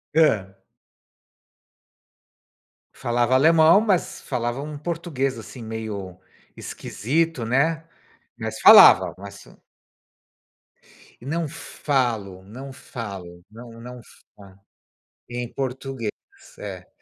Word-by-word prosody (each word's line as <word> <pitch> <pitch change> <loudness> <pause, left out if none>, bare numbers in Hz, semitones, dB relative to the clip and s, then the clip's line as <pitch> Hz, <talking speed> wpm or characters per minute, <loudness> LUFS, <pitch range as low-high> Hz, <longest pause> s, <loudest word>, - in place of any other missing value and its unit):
Hã? 105 -12 +2 2.4
Falava 120 +1 0
alemão, 160 +6 +6
mas 200 -5 0
falava 120 0 -3
um 150 0 -7
português, 150 -5 -3
assim, 110 +2 -10
meio 110 -4 -6 0.4
esquisito, 150 +5 -2
né, 140 +8 +1 0.5
mas - - -5
falavam, - - +8
mas 100 +1 -11 1.7
Não 155 +6 -3
falo, 120 - -2
não 130 +7 -10
falo, 95 -9 -9
não 115 +2 -12
não 125 +1 -10 0.4
falo. 100 -2 -16 0.7
Em 120 0 -5
português, 130 -3 -4 0.5
eh. 95 -3 -8
120 Hz, 85 wpm, -23 LUFS, 105-145 Hz, 2.4 s, falavam